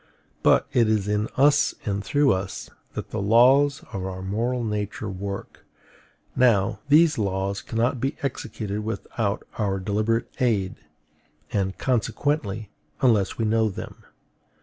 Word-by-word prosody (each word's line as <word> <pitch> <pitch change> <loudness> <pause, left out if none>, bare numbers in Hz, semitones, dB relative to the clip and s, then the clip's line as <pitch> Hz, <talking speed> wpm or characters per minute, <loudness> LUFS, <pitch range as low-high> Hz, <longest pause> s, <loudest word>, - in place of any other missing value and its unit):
But - - +4
it 115 -3 +4
is 105 -2 +1
in 105 +1 0
us 145 +2 +4
and 100 -2 -1
through 145 +2 +3
us 95 0 -5 0.2
that - - -6
the 110 - -2
laws 135 +8 +4
of 95 -2 -3
our 95 0 -5
moral 120 +6 -1
nature 105 -1 -3
work; 100 +1 -6 0.7
now, 110 -6 +3
these 155 -1 +5
laws 100 -1 -1
cannot 120 +2 -1
be 135 - -1
executed 105 -6 -3
without 110 -1 -3 0.2
our 100 -2 0
deliberate 110 +4 0
aid, 105 -7 +1 0.8
and, 95 -2 -1
consequently, 115 -4 -1 0.3
unless 110 -6 +3
we 115 - 0
know 110 0 +2
them. 95 - -8
110 Hz, 130 wpm, -24 LUFS, 100-125 Hz, 0.8 s, these